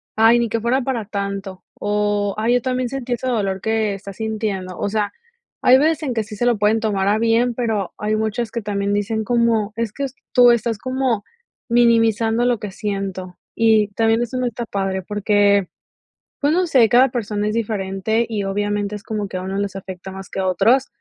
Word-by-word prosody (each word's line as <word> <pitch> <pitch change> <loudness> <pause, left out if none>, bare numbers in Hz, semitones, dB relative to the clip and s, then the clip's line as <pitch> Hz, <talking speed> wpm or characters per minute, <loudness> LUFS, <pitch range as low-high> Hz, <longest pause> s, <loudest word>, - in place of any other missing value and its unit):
"Ay, 225 +2 +5
ni 235 - +1
que 230 +1 -2
fuera 250 +4 +1
para 245 -3 -2
tanto 200 -2 -5 0.2
o, 205 -1 0
ay, 235 +3 +2
yo 245 - +2
también 255 -1 -1
sentí 255 -2 -3
ese 250 +2 -3
dolor 195 -6 -1
que 220 -1 0
está 200 0 -8
sintiendo". 210 -4 -3
O 205 - -1
sea, 210 -1 -1 0.5
hay 255 +1 +7
veces 315 +2 +2
en 260 -4 -1
que 220 - 0
sí 210 0 -9
se 240 - -1
lo 235 -3 +3
pueden 210 +2 +2
tomar 200 -3 0
a 210 +2 +2
bien, 230 +2 +2
pero 220 -6 -2
hay 215 +1 -1
muchas 220 +1 -2
que 235 - -3
también 200 -1 -1
dicen 215 +2 -1
como: 230 -3 +1
"Es 230 -2 -2
que 280 - -3
s 265 - -8 0.2
tú 245 -1 +7
estás 235 -2 0
como 255 -4 -1 0.5
minimizando 230 -1 +3
lo 245 -2 +2
que 205 -2 -6
siento." 195 -3 -4 0.2
Y 220 -2 +3
también 225 +3 +1
eso 245 +2 -3
no 250 - 0
está 235 0 -4
padre 195 -2 -2
porque, 205 -1 +2 0.7
pues 290 +1 +2
no 360 +1 +2
sé, 250 -8 +4
cada 250 +2 +5
persona 210 -3 -2
es 210 - -1
diferente 215 0 -1
y 210 -3 -2
obviamente 205 +1 -1
es 205 - -9
como 210 -2 -3
que 185 - -4
a - - -4
uno 190 +1 -3
les 200 -1 -2
afecta 190 0 -8
más 190 0 -9
que - - -5
a 190 - 0
otros, 225 +9 +3
220 Hz, 210 wpm, -20 LUFS, 200-235 Hz, 0.7 s, hay